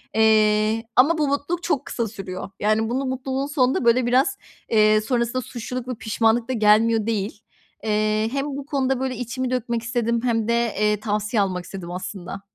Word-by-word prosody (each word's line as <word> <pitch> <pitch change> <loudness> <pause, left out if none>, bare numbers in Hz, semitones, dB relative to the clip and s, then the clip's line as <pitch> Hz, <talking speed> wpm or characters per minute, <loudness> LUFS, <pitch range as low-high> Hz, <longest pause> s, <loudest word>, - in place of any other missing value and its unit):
Eee, 215 0 +3
ama 300 +6 +5
bu 300 -2 +1
mutluluk 285 +5 -2
çok 290 -5 0
kısa 235 -2 -2
sürüyor. 195 -3 -7
Yani, 215 +2 +1
bunu 265 +3 -1
mutluluğun 260 +1 -2
sonunda, 260 -4 +1
böyle, 235 +1 +4
biraz, 265 +2 +2 0.3
eee, 215 -1 +4
sonrasında 240 +2 -1
suçluluk 250 +1 -6
ve 255 - -3
pişmanlık 225 +2 +1
da - - 0
gelmiyor 220 0 +3
değil. 210 -1 -2 0.4
Eee, 215 0 +1
hem 275 +1 -1
bu 280 -1 -5
konuda, 270 -3 0
böyle, 260 -1 -2
içimi 250 +2 -3
dökmek 235 -2 -1
istedim 235 0 0
hem 230 -3 0
de, 235 - +2 0.3
eee, 210 -1 +2
tavsiye 210 0 0
almak 185 -2 -1
istedim 175 -1 -8
aslında. 185 +1 -6
230 Hz, 170 wpm, -23 LUFS, 215-255 Hz, 0.4 s, ama